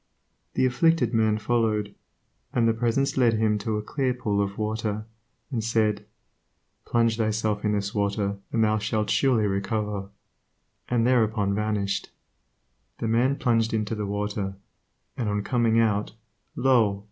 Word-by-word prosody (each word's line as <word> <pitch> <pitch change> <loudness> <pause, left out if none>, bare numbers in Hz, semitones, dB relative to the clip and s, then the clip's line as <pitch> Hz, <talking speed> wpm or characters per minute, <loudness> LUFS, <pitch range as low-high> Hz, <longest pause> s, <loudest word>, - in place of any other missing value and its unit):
The - - +3
afflicted 165 +5 +2
man 110 -1 +2
followed, 110 -3 0 0.6
and 115 -2 +3
the 115 - +3
Presence 120 +5 0
led 120 -3 +4
him 110 -1 +1
to 105 +1 -2
a 105 - -3
clear 130 +2 -1
pool 105 -5 0
of 100 0 -3
water, 110 0 -2 0.5
and 115 -4 -1
said, 110 -2 0 0.8
"Plunge 115 -1 +2
thyself 110 -2 0
in 105 - +1
this 100 0 -2
water 100 -1 -1
and 115 - +2
thou 110 0 +2
shalt 105 0 -1
surely 125 -6 +3
recover," 100 0 -2 0.8
and 120 -2 +2
thereupon 110 -5 +2
vanished. 105 -1 -1 0.9
The 115 - -3
man 120 +5 +2
plunged 115 -4 +1
into 110 0 -1
the 105 -2 -3
water, 100 -1 -3 0.6
and 115 -4 -2
on 105 0 -1
coming 115 -1 +2
out, 105 -2 +1 0.4
Io! 115 -7 +3
110 Hz, 145 wpm, -26 LUFS, 105-115 Hz, 0.9 s, led